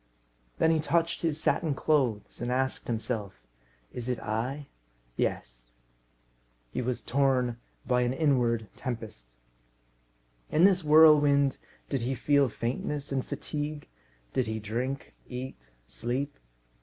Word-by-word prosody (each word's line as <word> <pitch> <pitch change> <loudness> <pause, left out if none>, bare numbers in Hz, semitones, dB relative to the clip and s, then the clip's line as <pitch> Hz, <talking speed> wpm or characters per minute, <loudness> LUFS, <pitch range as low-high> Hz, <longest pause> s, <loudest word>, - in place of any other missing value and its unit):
Then 160 - +4
he 160 - +2
touched 165 +2 +1
his 160 -2 0
satin 155 -2 +1
clothes, 130 -11 0
and 120 +1 -1
asked 130 +1 0
himself, 110 -4 -2 0.6
"Is 125 0 -5
it 125 - -1
I? 125 +7 -3 0.5
Yes." - - -3 1.0
He - - -2
was 125 0 -2
torn 130 -3 +1 0.3
by 125 -1 +2
an 120 0 +1
inward 125 -6 +1
tempest. 110 - -6 1.1
In 160 - +3
this 190 -2 +5
whirlwind, 150 -3 +6 0.3
did 135 -3 -1
he 130 +3 -1
feel 140 +1 +3
faintness 135 +6 -3
and 135 -2 0
fatigue? 150 0 -5 0.5
Did 130 - +1
he 110 0 -2
drink, 120 +6 -3 0.2
eat, 130 +1 -5 0.3
sleep? 125 - -3
130 Hz, 120 wpm, -29 LUFS, 115-145 Hz, 1.1 s, whirlwind